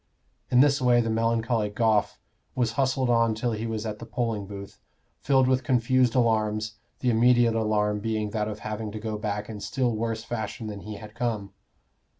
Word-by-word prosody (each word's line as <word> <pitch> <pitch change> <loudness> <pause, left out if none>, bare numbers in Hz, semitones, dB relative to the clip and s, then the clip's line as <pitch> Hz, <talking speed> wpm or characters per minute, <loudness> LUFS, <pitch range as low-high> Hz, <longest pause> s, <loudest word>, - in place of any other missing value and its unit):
In 125 0 +5
this 140 -1 +4
way 125 -1 +4
the 115 -1 0
melancholy 115 -1 +1
Goffe 105 -1 +1 0.4
was 120 -3 +1
hustled 130 0 +1
on 115 -1 +3
till 120 +2 -1
he 110 +1 -3
was 110 -1 -3
at 105 -1 -4
the - - -7
polling 115 -3 -2
booth, 100 -1 -9 0.4
filled 135 -2 +3
with 130 0 +2
confused 125 0 +2
alarms, 110 -3 +1 0.2
the 125 - +2
immediate 120 0 +4
alarm 105 -2 +1
being 110 -1 -2
that 105 -1 -1
of 105 -1 -6
having 110 0 -4
to 110 - -5
go 110 -1 -4
back 105 -1 -3
in 110 -2 -7
still 125 +2 -1
worse 115 0 -2
fashion 110 -2 -4
than 105 -2 -5
he 105 +1 -7
had 105 0 -10
come. 110 -5 -3
110 Hz, 185 wpm, -26 LUFS, 105-120 Hz, 0.4 s, In